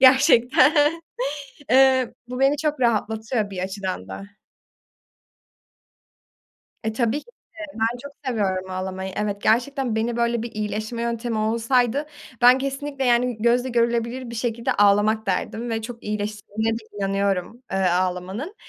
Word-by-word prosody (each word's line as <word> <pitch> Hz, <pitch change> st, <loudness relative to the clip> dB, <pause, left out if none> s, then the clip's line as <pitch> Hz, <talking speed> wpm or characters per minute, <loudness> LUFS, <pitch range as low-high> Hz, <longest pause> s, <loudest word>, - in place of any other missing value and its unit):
gerçekten, 260 Hz, +1 st, +6 dB, 1.0 s
eee, 260 Hz, -1 st, +5 dB
bu 250 Hz, +1 st, -5 dB
beni 275 Hz, +2 st, +4 dB
çok 300 Hz, -2 st, -1 dB
rahatlatıyor 220 Hz, -1 st, 0 dB
bir 190 Hz, -, -7 dB
açıdan 190 Hz, -, -4 dB
da. 95 Hz, -, -7 dB, 2.6 s
E, 220 Hz, 0 st, -2 dB
tabii 235 Hz, +5 st, 0 dB
ki -, -, -23 dB, 0.3 s
de -, -, -17 dB, 0.2 s
ben 230 Hz, +2 st, +1 dB
çok 285 Hz, 0 st, -9 dB
seviyorum 190 Hz, -6 st, -1 dB
ağlamayı. 190 Hz, 0 st, -4 dB
Evet 205 Hz, -1 st, -2 dB
gerçekten 250 Hz, +1 st, +1 dB
beni 230 Hz, +1 st, -1 dB
böyle 235 Hz, -1 st, +1 dB
bir 235 Hz, -, -6 dB
iyileşme 215 Hz, +2 st, -3 dB
yöntemi 235 Hz, -1 st, -2 dB
olsaydı 235 Hz, +5 st, +1 dB, 0.4 s
ben 250 Hz, +2 st, +8 dB
kesinlikle 275 Hz, 0 st, -3 dB
yani 245 Hz, -1 st, +2 dB
gözle 240 Hz, +3 st, +2 dB
görülebilir 235 Hz, +1 st, 0 dB
bir 235 Hz, -, -7 dB
şekilde 230 Hz, 0 st, -1 dB
ağlamak 205 Hz, +2 st, +3 dB
derdim 220 Hz, +5 st, -2 dB
ve 225 Hz, 0 st, -2 dB
çok 235 Hz, +1 st, -8 dB
iyileştirdiğine 210 Hz, +1 st, -2 dB
de -, -, -15 dB, 0.2 s
inanıyorum, 195 Hz, +3 st, -1 dB
eee, 195 Hz, -, 0 dB
ağlamanın. 185 Hz, -, -1 dB
230 Hz, 130 wpm, -23 LUFS, 205-250 Hz, 2.6 s, ben